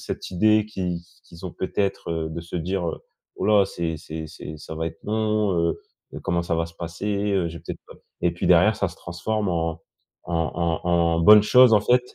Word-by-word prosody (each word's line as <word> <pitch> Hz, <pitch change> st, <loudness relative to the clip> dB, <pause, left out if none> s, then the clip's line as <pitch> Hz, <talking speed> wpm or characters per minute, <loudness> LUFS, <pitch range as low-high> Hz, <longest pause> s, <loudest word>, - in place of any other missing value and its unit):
cette -, -, -10 dB
idée 110 Hz, +3 st, +3 dB
qui 90 Hz, -5 st, -4 dB
qui 85 Hz, -1 st, -27 dB
qu'ils 85 Hz, +3 st, -12 dB
ont 90 Hz, -, -5 dB
peut-être, 100 Hz, -1 st, -2 dB
heu, 80 Hz, -1 st, -2 dB
de 85 Hz, -, -5 dB
se 85 Hz, +1 st, -8 dB
dire: 90 Hz, +1 st, -2 dB
«Heu, -, -, -5 dB, 0.4 s
oh -, -, -3 dB
là, 105 Hz, -2 st, +5 dB
c'est 85 Hz, -2 st, -3 dB
c'est 80 Hz, +1 st, -7 dB
c'est 75 Hz, 0 st, -9 dB
ça 75 Hz, -, -9 dB
va 80 Hz, +1 st, -2 dB
être 80 Hz, -, -9 dB
long, 105 Hz, -1 st, 0 dB, 0.2 s
heu -, -, -4 dB, 0.4 s
heu, -, -, -6 dB
comment 85 Hz, -2 st, 0 dB
ça 85 Hz, -1 st, -1 dB
va 85 Hz, 0 st, 0 dB
se 85 Hz, -, -13 dB
passer, 85 Hz, +4 st, -7 dB, 0.3 s
heu, 95 Hz, -3 st, +1 dB
j'ai 85 Hz, -1 st, -8 dB
peut-être -, -, -7 dB
pas» -, -, -12 dB, 0.3 s
et 85 Hz, -, +2 dB
puis 85 Hz, -, -3 dB
derrière, 90 Hz, +5 st, +5 dB
ça 95 Hz, -, 0 dB
se 85 Hz, -, -10 dB
transforme 100 Hz, +4 st, -3 dB
en 80 Hz, -1 st, -2 dB, 0.4 s
en 85 Hz, -, -6 dB, 0.5 s
en 90 Hz, -, -1 dB
en 85 Hz, -1 st, +2 dB
bonne 105 Hz, +4 st, +8 dB
chose, 125 Hz, 0 st, +6 dB
en 105 Hz, -, +6 dB
fait, 125 Hz, +3 st, +3 dB
85 Hz, 225 wpm, -24 LUFS, 85-105 Hz, 0.5 s, bonne